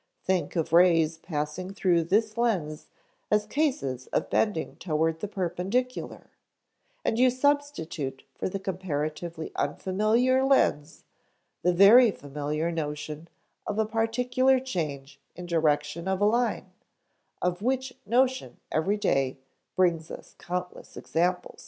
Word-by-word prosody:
Think 185 -1 -1
of 165 -1 -1
rays 165 -2 +4
passing 160 +4 -4
through 175 -4 +2
this 215 +4 +1
lens 185 -11 -1 0.4
as 210 0 +2
cases 210 - -1
of - - -2
bending 205 -7 0
toward 160 -1 -1
the 210 - -3
perpendicular, 195 +7 -3 0.7
and 225 - 0
you 255 0 +6
substitute 255 - -1
for - - -3
the 195 - -3
comparatively 165 -3 -4
unfamiliar 215 - +1
lens 165 - +1 0.6
the 180 - +3
very 210 +7 +7
familiar 150 0 -3
notion 150 0 -5 0.4
of 210 - -2
a 220 - +2
particular 245 +4 +2
change 150 - -5 0.2
in 180 - -8
direction 155 0 0
of 190 0 0
a 205 - +3
line, 220 -4 0 0.7
of 180 +1 -1
which 260 +2 -1
notion 255 +4 +1
every 190 +7 +1
day 135 -9 0 0.4
brings 170 -3 +1
us - - -10
countless 180 0 -6
examples." 180 +2 -1
180 Hz, 120 wpm, -27 LUFS, 160-225 Hz, 0.7 s, very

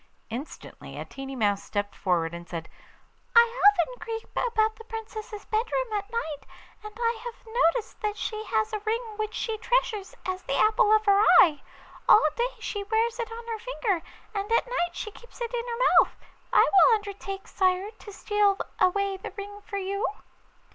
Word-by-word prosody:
Instantly 255 +7 -8
a - - -5
tiny 270 0 -7
mouse 205 -4 +1
stepped 205 -1 -3
forward 170 -4 0
and 170 0 -8
said: 165 -2 -5 0.7
'I - - +11
often 470 -1 +4
creep 450 0 -6
about 440 -2 +1
the 450 - -11
Princess's 435 -1 -7
bedroom 460 +1 -1
at 410 0 -2
night, 320 -11 -3 0.4
and 425 - -7
I 465 -1 0
have 480 -1 -8
noticed 455 0 0
that 420 -1 -2
she 430 -1 -3
has 220 - 0
a 430 - -1
ring 435 +2 0 0.2
which 430 0 -3
she 445 -2 -2
treasures 440 -4 0
as 370 0 -2
the - - -2
apple 430 -1 +4
of 435 0 +4
her 400 0 +5 0.2
eye. 300 -7 +3 0.5
All 365 - +8
day 480 +1 +1
she 410 -1 -4
wears 450 +3 0
it 460 -1 -3
on 460 +1 -7
her 455 -2 -4
finger, 450 -6 -1 0.3
and 405 +1 -3
at 460 - +3
night 350 -9 -2
she 425 - -5
keeps 480 +4 -16
it 475 0 -4
in 480 0 -2
her 470 0 -4 0.2
mouth. - - -12 0.4
I - - +7
will 425 +4 +6
undertake, 400 -2 -6
sire, 375 +2 +1
to 425 -1 -12
steal 410 -1 +2 0.2
away 395 +1 +2
the 380 - -7
ring 410 +1 -7
for 405 -1 -6
you. 395 +1 -2
425 Hz, 180 wpm, -27 LUFS, 385-455 Hz, 0.7 s, I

